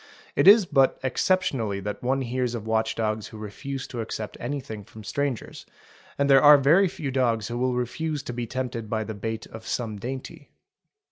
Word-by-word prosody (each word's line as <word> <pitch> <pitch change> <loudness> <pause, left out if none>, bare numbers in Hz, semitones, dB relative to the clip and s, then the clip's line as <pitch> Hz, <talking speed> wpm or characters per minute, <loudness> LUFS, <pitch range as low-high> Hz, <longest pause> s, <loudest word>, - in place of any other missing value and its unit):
It - - +3
is 205 0 +9
but 135 -5 +3
exceptionally 130 - 0
that 105 +1 -5
one 135 +2 0
hears 125 -1 -1
of 110 -2 -6
watch 110 0 0
dogs 110 -1 -1
who 110 - -11
refuse 125 +6 -6
to 120 - -4
accept 110 -1 -5
anything 120 -5 -5
from 110 +2 -13
strangers, 140 0 -3 0.5
and 140 - +2
there 135 -1 +7
are 150 0 +9
very 160 +8 +5
few 150 -5 -5
dogs 120 -5 +1
who 120 - -3
will 125 0 +1
refuse 145 +5 -2
to 125 - -5
be 120 -1 -4
tempted 120 -3 -4
by 110 0 -1
the 110 - -6
bait 110 +2 -4
of 110 0 -11
some 110 -4 -2
dainty. 130 +4 -7
125 Hz, 190 wpm, -25 LUFS, 110-135 Hz, 0.5 s, is